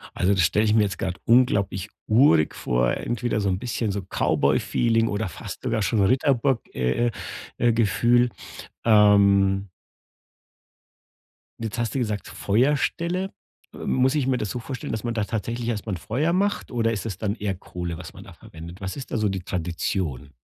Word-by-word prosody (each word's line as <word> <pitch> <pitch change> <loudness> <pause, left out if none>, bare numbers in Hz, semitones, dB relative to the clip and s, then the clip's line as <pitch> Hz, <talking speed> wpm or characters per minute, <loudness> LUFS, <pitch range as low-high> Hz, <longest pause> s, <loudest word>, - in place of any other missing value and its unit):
Also, 95 +2 +2
das 95 - +2
stelle 105 +6 +3
ich 105 -1 +2
mir 110 - +5
jetzt 100 -2 -2
gerade 90 - -3
unglaublich 105 -5 +2 0.2
urig 105 - +4
vor, - - +1
entweder 120 -2 -2
so 100 - 0
'n 95 -1 0
bisschen 115 -1 -2
so 100 0 -3
Cowboyfeeling 115 +4 +1
oder 105 0 -2
fast 85 - -8
sogar 110 - 0
schon 100 +2 +1
Ritterburg 130 +3 +2
äh 65 - +1 0.5
äh, 120 - +3
Gefühl. 120 +2 +3 0.5
Ähm 100 -2 +5 1.9
jetzt 115 0 -4
hast 120 -2 -1
du - - 0
gesagt, 105 -5 -2
Feuerstelle. 150 - 0 0.4
Äh, - - -10
muss 130 +2 +1
ich 145 -4 +1
mir 130 -1 +2
das 105 -4 -3
so 125 - -4
vorstellen, 125 +1 -6
dass 110 - -3
man 120 -1 -2
da 110 -2 0
tatsächlich 115 +2 -3
erst 110 -3 -3
mal 105 - -2
'n - - -2
Feuer 130 - -1
macht 200 +3 0
oder 115 -2 +1
ist 110 - -4
es 100 -5 -5
dann 105 -2 -1
eher 105 -4 -3
Kohle, 90 -2 -6
was 90 - -9
man - - -11
da - - -13
verwendet? 85 +4 -11
Was 95 -1 -5
ist 135 - -7
da - - -1
so 110 -2 +1
die 95 -2 -3
Tradition? 85 -5 -3
110 Hz, 180 wpm, -24 LUFS, 95-120 Hz, 1.9 s, mir